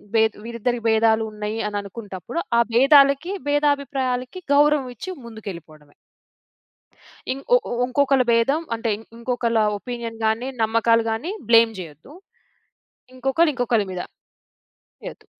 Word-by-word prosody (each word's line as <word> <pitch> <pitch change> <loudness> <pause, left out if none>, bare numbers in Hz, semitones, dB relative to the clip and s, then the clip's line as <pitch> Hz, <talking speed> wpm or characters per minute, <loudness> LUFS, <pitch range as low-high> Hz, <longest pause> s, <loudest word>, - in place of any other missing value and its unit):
బే 220 - +5 0.2
వీరిద్దరికి 235 0 -3
బేధాలు 220 0 +3
ఉన్నాయి 210 +1 -4
అని 205 0 -3
అనుకుంటప్పుడు, 200 - -6 0.2
ఆ - - +6
భేదాలకి 275 +6 +5 0.2
భేదాభిప్రాయాలకి 280 0 -1
గౌరవం 290 -2 +3
ఇచ్చి 310 - -8 0.2
ముందుకేళ్ళిపోవడమే. 170 -10 -10 1.4
ఇం 265 - -4
వువు 245 - +1
ఇంకొకళ్ళ 270 0 +2
భేదం 255 +7 +2
అంటే 225 0 -3 0.3
ఇంకొకళ్ళ 235 -1 -1 0.2
ఒపీనియన్‌గాని, 230 0 -3
నమ్మకాలు‌గాని, 230 - +1 0.2
బ్లేమ్ 230 -1 +6
చెయ్యొద్దు. 160 - -11 1.0
ఇంకొకళ్ళు 270 +6 +2
ఇంకొకలి 235 -4 +1
మీద 180 -1 -4 1.0
చెయ్యొద్దు. - - -10
235 Hz, 100 wpm, -22 LUFS, 220-270 Hz, 1.4 s, ఆ